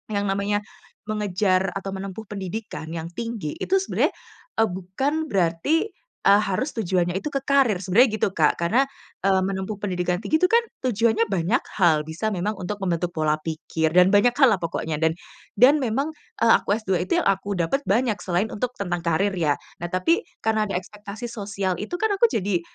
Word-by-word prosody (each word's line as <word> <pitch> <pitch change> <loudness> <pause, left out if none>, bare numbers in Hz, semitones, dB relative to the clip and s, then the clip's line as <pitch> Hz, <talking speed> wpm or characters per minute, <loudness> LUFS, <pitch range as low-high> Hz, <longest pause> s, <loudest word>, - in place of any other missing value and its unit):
yang 200 - +1
namanya 200 +1 0 0.4
mengejar 200 -3 +1
atau 195 0 -4
menempuh 195 +2 -6
pendidikan 195 -3 -5
yang 165 +1 -5
tinggi, 225 -6 -4
itu 380 - 0
sebenarnya, - - 0 0.5
eee, 225 - +3
bukan 190 +10 -2
berarti, 195 - +1 0.3
eee, 200 +1 +6
harus 195 +9 -1
tujuannya 180 -4 0
itu 290 +9 -4
ke 275 - 0
karir, 270 -9 +3
sebenarnya 220 +7 +4
gitu - - +3
Kak. 155 0 +3
Karena, 230 +11 +3 0.4
eee, 190 -1 +4
menempuh 190 +2 -3
pendidikan 180 -2 -1
tinggi 315 - +1
itu 365 - +3
kan 465 - +6 0.3
tujuannya 230 -1 +2
banyak 190 +8 +1 0.2
hal, 160 -5 +4
bisa 160 +7 -2
memang 205 +1 -1
untuk 190 +3 -4
membentuk 175 -1 0
pola 155 -1 +1
pikir 160 0 -2
dan 180 +1 +6
banyak 235 +4 +4
hal 270 -6 +6
lah 190 - -1
pokoknya 160 -2 -3
dan 160 0 +2 0.4
dan 265 +7 +6
memang, 265 +6 -1 0.3
eee, 230 - +6
aku 200 - +2
S2 190 -5 -1
itu - - +2
yang - - 0
aku 195 +1 0
dapat 180 +12 0
banyak 220 +1 +2
selain 185 +4 -1
untuk 250 +3 -3
tentang 175 -3 -2
karir 175 +4 +1
ya. 160 -6 +1 0.3
Nah 175 - -2
tapi 185 - +2 0.2
karena 220 -1 +1
ada - - -2
ekspektasi 210 +4 -8
sosial 195 -3 -2
itu 215 - -4
kan 440 +2 +1
aku 405 +4 +4
jadi 195 - 0
195 Hz, 180 wpm, -24 LUFS, 180-225 Hz, 0.5 s, eee